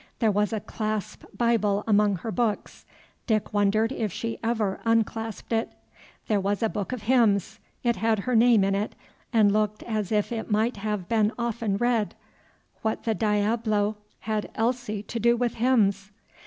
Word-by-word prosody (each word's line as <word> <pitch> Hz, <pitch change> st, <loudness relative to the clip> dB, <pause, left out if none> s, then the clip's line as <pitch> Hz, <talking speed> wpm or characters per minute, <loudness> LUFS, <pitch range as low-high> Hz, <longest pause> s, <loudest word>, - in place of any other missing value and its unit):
There 225 Hz, -3 st, +2 dB
was 205 Hz, +2 st, +1 dB
a 220 Hz, -, -1 dB
clasp 215 Hz, 0 st, -4 dB
Bible 210 Hz, -4 st, +2 dB
among 210 Hz, -2 st, +3 dB
her 220 Hz, +6 st, -5 dB
books. 225 Hz, -3 st, -2 dB, 0.4 s
Dick 215 Hz, -3 st, 0 dB
wondered 210 Hz, +3 st, +2 dB
if 220 Hz, -6 st, -2 dB
she 230 Hz, +6 st, -4 dB
ever 220 Hz, -4 st, 0 dB
unclasped 225 Hz, -1 st, -1 dB
it. 225 Hz, 0 st, -1 dB, 0.5 s
There 210 Hz, -2 st, +2 dB
was 200 Hz, +3 st, -1 dB
a 225 Hz, -, +2 dB
book 205 Hz, 0 st, -4 dB
of 250 Hz, -4 st, -5 dB
hymns; 220 Hz, -6 st, +2 dB, 0.2 s
it 235 Hz, -2 st, +1 dB
had 225 Hz, +2 st, +2 dB
her 245 Hz, +5 st, -1 dB
name 230 Hz, -2 st, +5 dB
in 195 Hz, 0 st, +1 dB
it, 205 Hz, +2 st, -2 dB, 0.4 s
and 215 Hz, -4 st, +4 dB
looked 215 Hz, 0 st, 0 dB
as 215 Hz, -4 st, -3 dB
if 210 Hz, +2 st, +1 dB
it 225 Hz, -2 st, -4 dB
might 220 Hz, +2 st, +1 dB
have 210 Hz, -3 st, -3 dB
been 220 Hz, -2 st, +2 dB
often 230 Hz, -4 st, -1 dB
read; 235 Hz, -2 st, 0 dB, 0.7 s
what 220 Hz, 0 st, -2 dB
the 225 Hz, -, +1 dB
diablo 215 Hz, 0 st, +1 dB, 0.3 s
had 215 Hz, -1 st, -2 dB
Elsie 225 Hz, -3 st, -1 dB
to 230 Hz, +3 st, -5 dB
do 235 Hz, +2 st, +3 dB
with 240 Hz, -1 st, 0 dB
hymns? 210 Hz, -5 st, +2 dB
215 Hz, 170 wpm, -26 LUFS, 205-230 Hz, 0.7 s, name